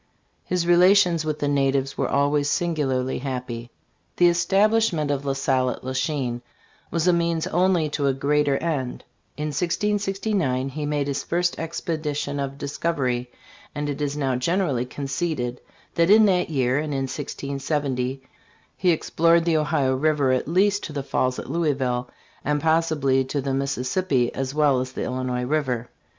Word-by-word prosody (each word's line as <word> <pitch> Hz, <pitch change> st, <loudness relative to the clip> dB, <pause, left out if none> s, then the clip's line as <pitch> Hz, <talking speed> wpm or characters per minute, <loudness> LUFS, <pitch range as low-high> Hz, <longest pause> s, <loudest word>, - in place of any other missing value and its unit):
His 180 Hz, -2 st, 0 dB
relations 175 Hz, -1 st, +5 dB
with 155 Hz, -1 st, -2 dB
the 145 Hz, -, -1 dB
natives 135 Hz, -1 st, +1 dB
were -, -, -1 dB
always 145 Hz, +1 st, +2 dB
singularly 135 Hz, -7 st, 0 dB
happy. 125 Hz, -3 st, -5 dB, 0.5 s
The 175 Hz, -1 st, +6 dB
establishment 190 Hz, -2 st, +2 dB
of 140 Hz, 0 st, -2 dB
La 135 Hz, -, 0 dB
Salle 130 Hz, -1 st, +1 dB
at -, -, -6 dB
La 130 Hz, +1 st, -4 dB
Chine 130 Hz, -5 st, -1 dB, 0.5 s
was 170 Hz, +1 st, 0 dB
a 180 Hz, -, +5 dB
means 170 Hz, -1 st, 0 dB
only 180 Hz, -3 st, +2 dB
to 145 Hz, -1 st, -1 dB
a 135 Hz, -, +2 dB
great 150 Hz, +2 st, +1 dB
er 135 Hz, -, +2 dB
end. 145 Hz, -7 st, -3 dB, 0.3 s
In 150 Hz, 0 st, -2 dB
1669 190 Hz, -4 st, -1 dB
he 150 Hz, +2 st, -4 dB
made 145 Hz, -1 st, 0 dB
his 140 Hz, -1 st, -2 dB
first 175 Hz, +1 st, 0 dB
expedition 155 Hz, -3 st, -3 dB
of 140 Hz, 0 st, -3 dB
discovery, 135 Hz, -4 st, -2 dB, 0.5 s
and 145 Hz, 0 st, -2 dB
it 145 Hz, +1 st, -6 dB
is 145 Hz, 0 st, -1 dB
now 135 Hz, -3 st, 0 dB
generally 135 Hz, -2 st, 0 dB
conceded 135 Hz, -2 st, -3 dB, 0.3 s
that 170 Hz, +1 st, +2 dB
in 215 Hz, +1 st, +7 dB
that 180 Hz, -4 st, +2 dB
year 130 Hz, -3 st, +1 dB
and 150 Hz, -1 st, -3 dB
in 135 Hz, -, -1 dB
1670 135 Hz, -1 st, -3 dB, 0.5 s
he 185 Hz, -, +1 dB
explored 165 Hz, 0 st, +3 dB
the 165 Hz, -2 st, +3 dB
Ohio 140 Hz, -3 st, +1 dB
river 145 Hz, -1 st, +2 dB
at 130 Hz, +1 st, 0 dB
least 200 Hz, +5 st, +2 dB
to 150 Hz, -, -7 dB
the 140 Hz, -1 st, -3 dB
falls 130 Hz, -1 st, 0 dB
at -, -, -6 dB
Louisville, 135 Hz, -5 st, -1 dB, 0.3 s
rmd 150 Hz, +1 st, 0 dB
possibly 155 Hz, -4 st, +2 dB
to 140 Hz, +2 st, -2 dB
the 135 Hz, 0 st, -2 dB
Mississippi 135 Hz, 0 st, 0 dB
as 135 Hz, +1 st, -3 dB
well 145 Hz, -4 st, +3 dB
as 130 Hz, +1 st, -4 dB
the -, -, -3 dB
Illinois 125 Hz, -1 st, -2 dB
river. 130 Hz, -4 st, -1 dB
145 Hz, 165 wpm, -24 LUFS, 130-165 Hz, 0.5 s, in